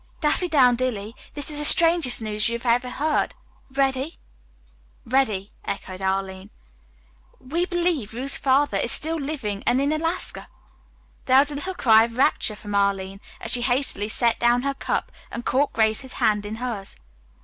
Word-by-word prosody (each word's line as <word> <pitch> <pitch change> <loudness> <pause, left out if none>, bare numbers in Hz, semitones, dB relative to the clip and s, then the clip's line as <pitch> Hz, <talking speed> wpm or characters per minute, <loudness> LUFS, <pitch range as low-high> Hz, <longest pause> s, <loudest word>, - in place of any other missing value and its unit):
"Daffydowndilly, 255 - +2 0.2
this 290 +1 -2
is 295 - -3
the - - -2
strangest 330 -7 +3
news 215 +1 +1
you 235 0 -3
ever 245 +1 +1
heard. 300 +4 -1 0.4
Ready?" 270 +3 0 0.9
"Ready," 220 -6 0
echoed 190 -1 -6
Arline. 190 0 -2 0.9
"We 335 +7 -2
believe 340 - -1
Ruth's 270 +3 +1
father 270 -5 +2
is 235 - +1
still 325 +2 -1
living 265 -9 -4
and 250 - +3
in 280 +2 +1
Alaska." 325 +3 -3 0.8
There 260 0 +5
was 285 +2 +4
a - - -5
little 370 +6 -5
cry 225 -7 +5
of 230 0 -9
rapture 235 -4 +2
from 205 0 -8
Arline 195 -1 0 0.2
as 380 - -4
she 245 - +3
hastily 245 -4 +2
set 235 +1 +1
down 240 +1 +3
her 275 0 0
cup - - -3 0.2
and 235 - -7
caught 275 +3 +1
Grace's 220 +4 0
hand 210 -1 +1
in 215 - -5
hers. 225 -5 -5
250 Hz, 155 wpm, -24 LUFS, 215-285 Hz, 0.9 s, There